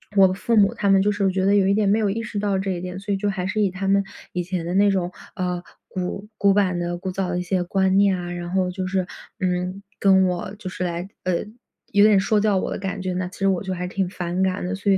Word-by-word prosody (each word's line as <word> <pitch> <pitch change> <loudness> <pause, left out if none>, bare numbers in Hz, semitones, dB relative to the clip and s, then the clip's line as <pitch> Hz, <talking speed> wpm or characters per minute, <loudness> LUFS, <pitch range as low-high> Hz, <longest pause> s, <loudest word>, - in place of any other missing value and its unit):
我 195 -1 +7
的 185 - -1
父 230 +3 0
母 200 -2 +5
他 200 - 0
们 195 0 +5
就 210 - +2
是 200 -1 +1
觉 190 0 0
得 200 +1 +4
有 195 -2 +4
一 200 - +4
点 205 -1 +2
没 210 - +4
有 210 - +1
意 225 +3 -2
识 210 - -6
到 200 -2 0
这 195 0 -2
一 175 -1 -3
点， 180 +1 -5
所 205 - -5
以 - - 0
就 205 +1 -1
还 185 -1 -3
是 215 +3 -2
以 195 -3 +2
他 195 +1 -4
们 200 0 +3 0.3
以 180 -1 -1
前 180 -1 -3
的 175 - -3
那 200 +1 +5
种， 180 -2 -1 0.2
呃， 180 -1 -2 0.3
古 190 +2 -4
古 200 -1 +4
板 190 -3 +2
的、 175 0 -2
古 190 - -4
早 185 0 -2
的 180 0 -1
一 - - -1
些 180 0 0
观 190 +1 +2
念 200 -1 +4
啊， 175 0 -5
然 175 0 -5
后 185 -1 +1
就 185 0 -4
是， 185 -1 -1 0.3
嗯， 180 +1 -1 0.2
跟 190 -1 +5
我 185 +2 -3
就 185 - -5
是 185 0 -4
来， 175 +2 -3
呃， 180 -2 +1 0.6
有 205 +1 +6
点 210 -2 +6
说 210 +2 +2
教 210 -2 +2
我 - - -2
的 - - -2
感 195 0 -4
觉 185 0 -2
呢， 180 0 -2
其 - - -12
实 195 - +2
我 190 -2 +1
就 190 -1 -3
还 180 0 -3
挺 190 0 -1
反 180 0 -2
感 190 +1 0
的。 185 - -2
所 200 +1 0
以 - - +4
190 Hz, 315 characters per minute, -23 LUFS, 180-200 Hz, 0.6 s, 我